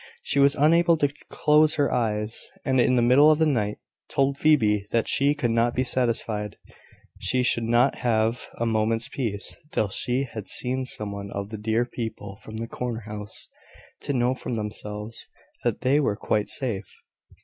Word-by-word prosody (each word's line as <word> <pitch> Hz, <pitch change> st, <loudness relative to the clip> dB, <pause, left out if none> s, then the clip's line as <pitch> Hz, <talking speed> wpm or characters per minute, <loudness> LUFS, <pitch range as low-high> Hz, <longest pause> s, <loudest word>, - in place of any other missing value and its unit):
She -, -, 0 dB
was 140 Hz, 0 st, +5 dB
unable 165 Hz, +3 st, +4 dB
to 145 Hz, -2 st, +1 dB, 0.2 s
close 150 Hz, +1 st, +3 dB
her 145 Hz, -2 st, +1 dB
eyes, 110 Hz, -2 st, 0 dB, 0.2 s
and 130 Hz, -1 st, +2 dB
in 125 Hz, +1 st, +3 dB
the 120 Hz, -, +3 dB
middle 135 Hz, +5 st, +6 dB
of 155 Hz, -, +5 dB
the 160 Hz, -, +3 dB
night 105 Hz, -8 st, 0 dB, 0.3 s
told 135 Hz, 0 st, +1 dB
Phoebe 110 Hz, -9 st, +3 dB
that 115 Hz, -1 st, +1 dB
she 140 Hz, +2 st, +2 dB
could 125 Hz, -5 st, 0 dB
not 115 Hz, +1 st, +1 dB
be 130 Hz, -, +2 dB
satisfied 115 Hz, -4 st, -1 dB, 0.6 s
she 130 Hz, -1 st, 0 dB
should 115 Hz, -2 st, +1 dB
not 120 Hz, +4 st, +2 dB
have 115 Hz, 0 st, 0 dB
a 115 Hz, -, -2 dB
moment's 115 Hz, 0 st, +1 dB
peace 105 Hz, -6 st, -4 dB
till 105 Hz, -9 st, 0 dB
she 125 Hz, +6 st, -1 dB
had 115 Hz, -6 st, -7 dB
seen 130 Hz, +1 st, -1 dB
some 105 Hz, -4 st, -5 dB
one 100 Hz, 0 st, -6 dB
of 100 Hz, 0 st, -5 dB
the 110 Hz, -, -5 dB
dear 110 Hz, +3 st, +1 dB
people 110 Hz, -4 st, -6 dB
from 110 Hz, 0 st, -9 dB
the 115 Hz, +1 st, -4 dB
corner 120 Hz, -1 st, -4 dB
house, 105 Hz, -1 st, -6 dB, 0.5 s
to 145 Hz, -, -3 dB
know 125 Hz, -1 st, +2 dB
from 125 Hz, -2 st, -5 dB
themselves 105 Hz, 0 st, -5 dB, 0.3 s
that -, -, -1 dB
they 135 Hz, +3 st, +3 dB
were 120 Hz, -8 st, +1 dB
quite 105 Hz, 0 st, -1 dB
safe. 120 Hz, -8 st, -3 dB
120 Hz, 180 wpm, -25 LUFS, 110-135 Hz, 0.6 s, middle